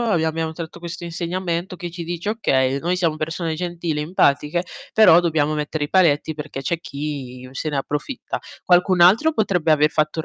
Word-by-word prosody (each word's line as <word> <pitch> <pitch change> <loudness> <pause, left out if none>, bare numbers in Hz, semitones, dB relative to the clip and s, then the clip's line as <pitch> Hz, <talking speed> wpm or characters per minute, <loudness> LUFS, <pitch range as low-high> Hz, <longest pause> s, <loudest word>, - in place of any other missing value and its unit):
abbi 210 -9 +1
abbiamo 160 0 -1
tratto 165 +1 -8
questo 170 0 -7
insegnamento 175 +1 -3
che 175 0 -6
ci 170 0 -7
dice: 175 +4 -3
"Okay, 135 - +1
noi 175 +4 0
siamo 165 -4 0
persone 160 +1 -3
gentili, 170 -2 -3
empatiche, 150 0 +1 0.3
però 210 -6 +7
dobbiamo 155 -3 +1
mettere 150 0 -2
i - - -5
paletti 160 -4 +3
perché 150 -2 -6
c'è 170 +4 -2
chi 140 -5 -6
se 135 +4 -3
ne 150 - -2
approfitta." 150 - -4 0.2
Qualcun 180 0 +4
altro 225 - +5
potrebbe 180 -7 +1
aver 150 0 +4
fatto 155 +1 0
un - - -6
165 Hz, 180 wpm, -21 LUFS, 150-175 Hz, 0.3 s, però